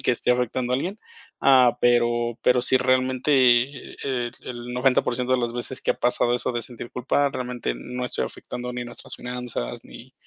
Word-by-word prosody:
el - - -11
que - - +2
esté 120 - 0
afectando 125 0 -1
a - - +3
alguien, 190 +10 -3 0.4
ah, 125 -3 +5
pero 120 -1 +2
pero, 125 0 +4
si 130 - +3
realmente 130 +2 +1 0.7
el 125 -3 -2
el 120 0 -7
90%, 125 -1 +1
de 130 - +3
las 120 -1 -1
veces 120 +2 -5
que - - +1
ha - - -15
pasado 120 0 +2
eso 125 - -1
de 120 - -1
sentir 120 0 -8
culpa, 140 +3 +1
realmente 125 - -3
no 125 - -5
estoy 125 - -1
afectando 125 0 -6
ni 120 0 -4
nuestras 120 - -6
finanzas, 125 - -4
ni - - -13
125 Hz, 185 wpm, -24 LUFS, 120-130 Hz, 0.7 s, ah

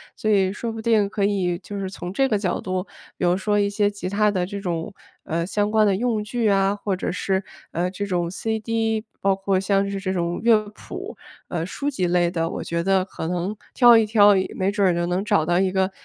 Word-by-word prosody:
所 215 - -1
以 190 -2 +3
说 230 +2 -4
不 225 0 -6
定 220 -3 +2
可 200 -1 0
以 185 -4 0
就 205 +2 -7
是 195 -1 -3
从 180 -1 -7
这 270 +5 +2
个 215 - +2
角 190 -3 -2
度， 185 +1 -3 0.3
比 - - -1
如 175 0 +3
说 205 +2 0
一 200 0 +2
些 205 0 +1
吉 200 -2 -6
他 210 +2 +2
的 185 -3 0
这 200 +2 -6
种， 175 +1 -3 0.3
呃， 170 +1 -1
相 205 +3 0
关 215 0 +4
的 195 -2 +2
用 225 -1 0
具 225 +1 -1
啊， 195 -1 +3
或 205 -1 -2
者 185 - -3
是， 190 +1 -1 0.3
呃， 180 +2 -1
这 200 +2 -4
种 175 -3 -1
CD， 225 +1 -1 0.2
包 195 0 +2
括 195 0 0
像 195 +1 +1
是 200 - -3
这 190 -1 -2
种 175 -1 -1
乐 225 -2 +4
谱， - - -8 0.3
呃， 170 -2 -2
书 280 +10 -3
籍 185 -11 -1
类 175 0 +2
的， 165 -1 -1
我 - - -5
觉 170 0 -2
得 190 +1 +2
可 175 -3 -6
能 180 +4 -2 0.2
挑 240 -2 +7
一 225 - +4
挑， 205 -1 +6 0.2
没 190 +1 0
准 200 -2 +2
儿 180 - +3
也 175 - 0
能 180 +3 -1
找 205 -7 +2
到 175 +2 +2
一 190 0 +2
个， 190 0 0
195 Hz, 260 characters per minute, -23 LUFS, 180-210 Hz, 0.3 s, 挑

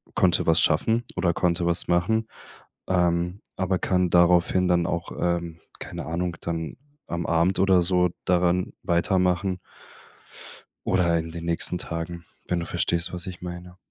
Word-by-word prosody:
konnte 90 -3 +3
was 80 0 +5
schaffen 110 +10 +2
oder 90 -1 +1
konnte 85 0 0
was 85 0 +1
machen. 100 +6 +1 0.6
Ähm, 90 +1 0 0.2
aber 95 0 0
kann 90 +1 +1
daraufhin 90 +1 +4
dann 85 -1 +2
auch, 85 0 -3
ähm, 85 -1 -1 0.2
keine - - -7
Ahnung, 85 +1 -3
dann 80 -2 -4 0.3
am 85 -1 -3
Abend 85 +3 +2
oder 95 -2 +4
so 90 0 +3 0.2
daran 90 0 +1
weitermachen 90 +1 +1 1.3
oder 85 -2 +2
in 80 0 -4
den 85 0 -7
nächsten 85 +1 +1
Tagen, 85 0 -6 0.2
wenn 90 - 0
du 85 - -4
verstehst, 85 0 0
was 90 0 -4
ich 90 -2 -7
meine. 90 0 -8
85 Hz, 145 wpm, -25 LUFS, 85-90 Hz, 1.3 s, was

